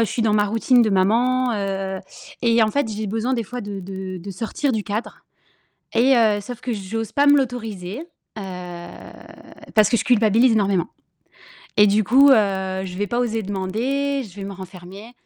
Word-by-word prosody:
je 225 - +1
suis 235 - -1
dans 215 -1 +2
ma 210 -1 +3
routine 230 +4 +3
de 220 - +1
maman, 240 +6 +2
heu 195 -1 -3 0.4
et 230 -1 +4
en 215 - +2
fait, 285 0 0
j'ai 215 0 -4
besoin 225 +5 -1
des 235 - -1
fois 245 +4 -6
de 200 -1 -6
de 190 0 -6
de 190 +3 -8
sortir 225 +8 -2
du 215 -3 -2
cadre 215 +3 -5 0.7
et 260 +3 +4
heu 215 -3 +3
sauf 240 +3 -8
que 250 - -3
j'ose 215 +1 -4
pas 285 +1 +2
me 290 0 +7
l'autoriser. 225 - -3 0.4
Heu, 205 - -5 1.3
parce 215 -2 +6
que 235 - +2
je - - -1
culpabilise 230 +1 +4
énormément 200 -5 +1 0.9
et 210 -1 +7
du 210 +2 +3
coup, 270 +7 +6
heu, - - +9 0.5
je 180 -1 -7
vais 205 - 0
pas 240 +4 -1
oser 225 -2 -1
demander, 245 +9 -2
je 190 - -13
vais 200 - -6
me 200 - -6
renfermer 190 +3 -11
215 Hz, 190 wpm, -21 LUFS, 195-245 Hz, 1.3 s, heu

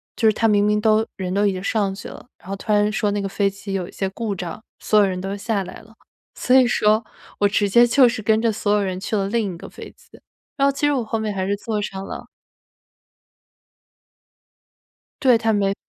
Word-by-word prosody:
就 220 -2 +3
是 - - +2
它 225 - +1
明 205 -2 +3
明 210 0 +2
都 220 0 +3
人 185 -1 -3
都 205 +1 +2
已 200 - +2
经 185 - -5
上 200 -2 0
去 200 - -9
了， - - -12
然 - - -19
后 195 - -2
突 215 +2 -5
然 210 0 +3
说 215 -1 0
那 205 - -1
个 195 - -2
飞 200 0 +1
机 195 0 -8
有 180 -2 -2
一 - - -12
些 195 - -3
故 205 0 -4
障， 180 +4 -7 0.2
所 215 - +3
有 205 - +5
人 185 -1 -3
都 195 +1 -4
下 200 -1 -1
来 - - -10
了。 220 +1 -20 0.4
所 250 - +2
以 255 -2 +6
说 215 -1 +2 0.4
我 205 - +4
直 205 0 +1
接 240 +4 +6
就 255 +1 +5
是 225 - -4
跟 220 +1 +2
着 230 -1 +2
所 205 0 -2
有 210 - +2
人 185 -1 -3
去 215 - -3
了 195 -1 0
另 215 -5 -1
一 - - -11
个 - - -10
飞 - - -10
机， - - -19 0.4
然 275 0 +3
后 - - +3
其 280 +2 -2
实 290 - +3
我 250 -4 0
后 225 +1 -3
面 215 -1 -2
还 190 -1 -2
是 200 - 0
坐 210 0 -3
上 195 -1 -5
了。 - - -8 2.9
对， 250 -4 +5
它 225 0 0
没 200 -1 +1
是 195 - -2
210 Hz, 265 characters per minute, -21 LUFS, 195-225 Hz, 2.9 s, 以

